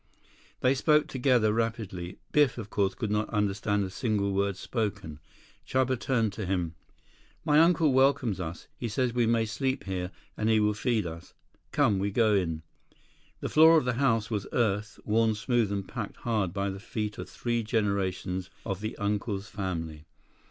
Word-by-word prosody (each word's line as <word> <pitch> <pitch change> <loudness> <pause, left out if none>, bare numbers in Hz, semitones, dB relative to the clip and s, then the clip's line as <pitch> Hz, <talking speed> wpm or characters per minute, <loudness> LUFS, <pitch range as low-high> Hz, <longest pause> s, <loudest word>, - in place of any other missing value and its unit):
They 130 +1 +4
spoke 150 +2 +3
together 125 -5 +2
rapidly. 110 -6 -3
Biff, 145 -4 +3
of 110 -3 -7
course, 95 -2 +1
could 110 -1 -3
not 105 +1 0
understand 105 0 0
a 95 - -4
single 100 -3 0
word 100 0 0
spoken. 95 - -3 0.4
Chuba 130 -1 0
turned 115 -6 0
to 105 - -4
him. 90 -4 -1 0.7
"My 150 -1 +5
uncle 165 -3 +4
welcomes 130 -6 +3
us. 85 -2 -5
He 120 - -2
says 120 +2 0
we 120 -2 +2
may 115 -1 +2
sleep 130 +5 -2
here, 90 -2 -3 0.3
and 110 - 0
he 110 -1 +4
will 105 0 +2
feed 110 -1 0
us. 80 0 -8 0.4
Come, 100 -2 +3
we 100 +1 0
go 110 +1 +3
in." 80 -5 0 0.8
The - - -2
floor 160 +1 +7
of 155 - +1
the 125 - +1
house 115 -5 +2
was 105 -3 -2
earth, 110 -2 0
worn 110 0 +2
smooth 115 -1 +1
and 100 -1 -3
packed 110 -5 -6
hard 110 -7 -1
by 100 +1 -2
the 95 - -7
feet 105 -1 -4
of - - -6
three 120 -1 -1
generations 100 -4 -1 0.2
of 95 -2 -3
the 110 +1 -4
uncle's 105 0 -2
family. 80 -6 -4
105 Hz, 175 wpm, -28 LUFS, 100-120 Hz, 0.8 s, floor